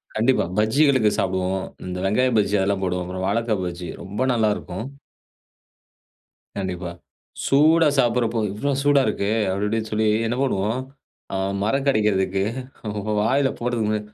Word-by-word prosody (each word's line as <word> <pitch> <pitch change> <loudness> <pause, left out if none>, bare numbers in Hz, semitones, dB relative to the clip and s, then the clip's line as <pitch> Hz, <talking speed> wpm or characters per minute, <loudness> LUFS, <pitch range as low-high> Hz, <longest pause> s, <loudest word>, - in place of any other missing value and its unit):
கண்டிப்பா. 120 +4 +3
பஜ்ஜிகளுக்கு 115 +1 +4
சாப்டுவோம். 95 0 -1 0.2
இந்த 90 0 -4
வெங்காயம் 120 +3 +2
பஜ்ஜி 105 0 +1
அதெல்லாம் 95 0 0
போடுவோம். 90 -1 -1
அப்பறம் 95 +1 -4
வாழக்கா 115 -1 +1
பஜ்ஜி 90 0 -5
ரொம்ப 100 +6 -5
நல்லா 110 -2 +2
இருக்கும். 95 +5 -6 1.7
கண்டிப்பா. 90 -2 -3 0.6
சூடா 155 +3 +5
சாப்படறப்போ 120 -2 +2
"இவ்ளோ 140 +7 -1
சூடா 145 -1 +5
இருக்கே!" 100 -1 -1 0.2
அப்டி 100 +2 -1
இப்டின்னு 110 0 -2
சொல்லி 110 0 +1 0.2
என்ன 120 - -1
பண்ணுவோம். 110 -2 0 0.5
அ - - 0 0.3
மறக்கடைக்கிறதுக்கு 105 -6 +1 0.8
வாயில 135 +5 +2
போடுறதுக்கு 110 -3 0
110 Hz, 125 wpm, -23 LUFS, 95-125 Hz, 1.7 s, சூடா